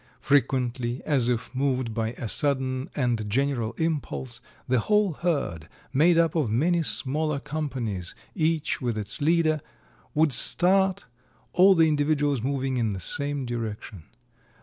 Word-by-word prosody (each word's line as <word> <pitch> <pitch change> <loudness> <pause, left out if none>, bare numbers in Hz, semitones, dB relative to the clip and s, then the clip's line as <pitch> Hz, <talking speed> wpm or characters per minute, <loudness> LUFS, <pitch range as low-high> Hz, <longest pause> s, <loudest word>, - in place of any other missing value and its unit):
Frequently, 130 -3 0
as 135 -6 +2
if 120 0 -2
moved 130 -3 -1
by 115 +1 -2
a 120 - -6
sudden 130 - 0
and 120 -6 -1
general 120 -1 -1
impulse, 140 -6 -3 0.3
the 130 -1 +2
whole 210 - +2
herd, 140 - -2 0.2
made 165 +5 +4
up 165 -2 +3
of 150 -9 0
many 165 +10 +1
smaller 150 0 +1
companies, 130 - -4 0.2
each 160 -4 -1
with 120 -3 -2
its 105 +3 -2
leader, 155 0 +2 0.5
would 155 -2 +3
start, 190 +6 +4 0.5
all 190 +2 +6
the 165 -1 +4
individuals 145 -3 +1
moving 135 0 -2
in 115 -4 0
the 95 - -5
same 140 +6 -1
direction. 110 -7 -6
135 Hz, 135 wpm, -25 LUFS, 120-155 Hz, 0.5 s, all